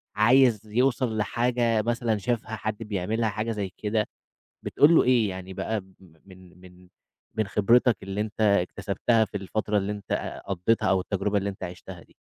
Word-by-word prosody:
عايز 120 +1 +4
يُوصَل 120 0 +1
لحاجة 115 +1 +1
مثلًا 115 0 0
شافها 110 +2 -2
حد 110 -1 -4
بيعملها 105 +2 -1
حاجة 110 +2 -3
زي 105 -3 -3
كده 105 0 -1 0.6
بتقول 155 +4 +4
له - - +6
إيه؟ 120 -4 +3
يعني 95 0 -7
بقى 110 +3 -2
م 95 0 -22 0.3
من 90 -2 -16
من 90 0 -16 0.5
من 110 -2 0
خِبرتك 115 +3 +3
اللي 100 +2 -3
أنت 110 +1 -5
اكتسبتها 105 +3 +1
في 105 - -5
الفترة 105 +2 -2
اللي 100 0 -1
أنت 105 -1 -4
قضّيتها 100 +4 +1
أو 95 -1 +2
التجربة 100 +2 -1
اللي 100 0 -1
أنت 95 - -8
عِشتها 90 0 -8
دي؟ - - -27
105 Hz, 165 wpm, -26 LUFS, 95-115 Hz, 0.6 s, له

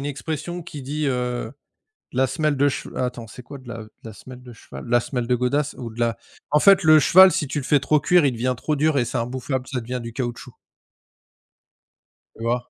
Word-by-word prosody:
une 140 - -4
expression 160 +4 -5
qui 150 -4 -9
dit, 150 +3 -3
heu: 125 -2 -2 0.6
«La 130 +1 +2
semelle 155 -1 0
de 140 +1 +3
chev» - - -6
attends, 125 -2 -3
c'est 125 +3 -12
quoi 140 - -10
de 130 -2 -16
la 115 - -6
de 110 - -16 0.2
la 110 - -8
semelle 125 +4 -12
de 120 -2 -12
cheval? 70 -10 -11
De - - -8
la 120 - +5
semelle 125 -2 -4
de 125 - +2
godasse 135 +4 -1
ou 120 -2 -6
de 110 - -12
la 115 -1 0 0.3
en 150 - +4
fait, 195 +1 +5
le 155 -1 +7
cheval 185 +4 +7
si 150 - -1
tu 150 - -4
le 130 - -7
fais 145 - +3
trop 150 +2 +2
cuire, 175 +2 +3
il 135 - +3
devient 125 +2 -1
trop 150 +6 -2
dur 155 0 +2
et 125 - +3
c'est - - -3
imbouffable, 130 +2 -3
ça 130 -3 -3
devient 125 +2 -5
du 115 -1 -8
caoutchouc. 120 -2 -5 1.8
Tu 115 - -9
vois? 120 +1 -2
130 Hz, 235 wpm, -22 LUFS, 120-150 Hz, 1.8 s, le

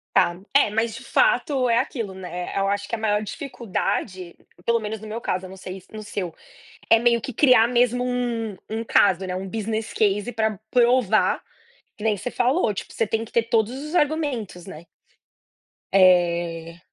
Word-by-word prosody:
Tá. 175 +1 +3
É, 280 -6 +5
mas 225 +1 0
de 265 - -9
fato 260 -1 +2
é 230 - +3
aquilo, 225 -6 -2
né, 180 -1 -6
eh, - - +1
eu 195 - +1
acho 200 0 -1
que - - -2
a - - -6
maior 210 -1 +1
dificuldade, 205 - -4
p 175 - -27
pelo 235 0 +2
menos 215 0 -5
no 215 - -10
meu 225 +2 -5
caso, 185 -3 -2
eu - - -9
não 190 - -11
sei 185 0 -8
no 215 - -6
seu, 195 -5 -5 0.6
é 225 - +7
meio 235 0 +3
que 260 - -6
criar 250 -3 +5
mesmo 245 0 +2
um 240 -4 -2
um 225 +1 -3
caso, 190 -3 +3
né, 180 - -3
um 190 +1 -4
business 220 +1 -3
case 210 +2 +1
pra 220 -2 -1
provar, 240 -3 +3 0.6
que 210 - -9
nem 215 -2 +1
você 250 - -4
falou, 245 - +1
tipo - - -7
você 225 - 0
tem 225 +1 -1
que 230 - -12
ter 235 - +2
todos 230 +1 +1
os 305 +4 -6
argumentos, 285 - -1
né? 170 -3 -10 1.1
Eh 170 -3 +3
220 Hz, 190 wpm, -23 LUFS, 190-240 Hz, 1.1 s, é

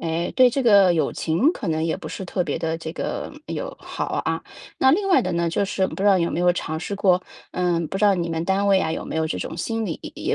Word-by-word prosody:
诶， 165 +1 -2
对 255 -1 +6
这 270 +2 -1
个 200 -6 +6
友 160 - 0
情 195 - +1
可 205 - -5
能 160 0 0
也 165 - 0
不 - - -7
是 190 - -6
特 180 0 -1
别 150 -3 -3
得 165 0 -2
这 160 -1 -6
个 - - -4 0.2
友 - - -5
好 - - -5 0.2
啊。 - - -1 0.4
那 265 - +5
另 390 +6 +2
外 360 -9 +5
的 - - -2
呢， 170 0 0
就 175 - 0
是 190 -1 0
不 - - -8
知 195 - -2
道 195 -2 +5
有 170 - 0
没 175 - -2
有 180 - +4
尝 160 -2 -3
试 200 +3 -4
过， 185 -2 +3 0.3
嗯， 175 -2 0
不 195 - -3
知 210 - +2
道 200 - +5
你 170 -2 -2
们 165 0 -2
单 195 +1 +1
位 195 -1 +5
呀， 160 - -1
有 - - -4
没 - - -5
有 160 0 +1
这 - - -3
种 - - -5
心 225 +5 -2
理， 170 - -4 0.2
也 - - -1
180 Hz, 300 characters per minute, -23 LUFS, 165-200 Hz, 0.4 s, 对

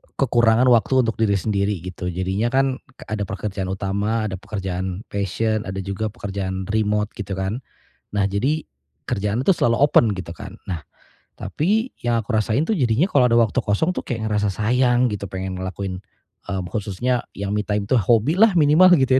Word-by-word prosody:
k - - +1
kekurangan 120 -1 +4
waktu 125 +3 +4
untuk 115 - -1
diri 110 -3 +3
sendiri 100 0 0
gitu. 90 0 -6
Jadinya 95 +5 -1
kan 135 -1 +2 0.2
k - - -17
ada 110 -1 -1
pekerjaan 95 0 -4
utama, 100 +4 -1
ada 95 - -4
pekerjaan 95 -2 -4
passion, 105 +2 -1
ada 95 +1 -4
juga 100 +3 -3
pekerjaan 95 -4 -4
remote 105 -1 +1
gitu 100 -3 -4
kan. 95 +4 -2 0.6
Nah 100 - +2
jadi, 130 +11 0 0.4
kerjaannya 105 +5 -1
tuh 195 - +6
selalu 115 0 +2
open 120 -6 +4
gitu 90 -2 -6
kan. - - -9
Nah, 85 -4 -3 0.5
tapi 215 - 0
yang 120 -1 +1
aku 110 - -11
rasain 110 +5 +1
tuh 220 - +2
jadinya 125 +4 +2
kalau 130 -6 +4
ada 115 - +5
waktu 115 0 +1
kosong 110 - +1
tuh - - -2
kayak 110 -3 -2
ngerasa 105 -1 +1
sayang 125 +4 +2
gitu 100 -1 -4
pengen 95 0 -4
ngelakuin, 95 0 -4 0.5
mmm, 95 -2 -2
khususnya 110 +4 -1
yang 100 0 -3
me 105 - +1
time 105 -1 0
itu 130 - +3
hobi 115 - +3
lah 220 0 +6
minimal 160 +5 +6
gitu 130 -1 +3
105 Hz, 180 wpm, -22 LUFS, 95-120 Hz, 0.6 s, tuh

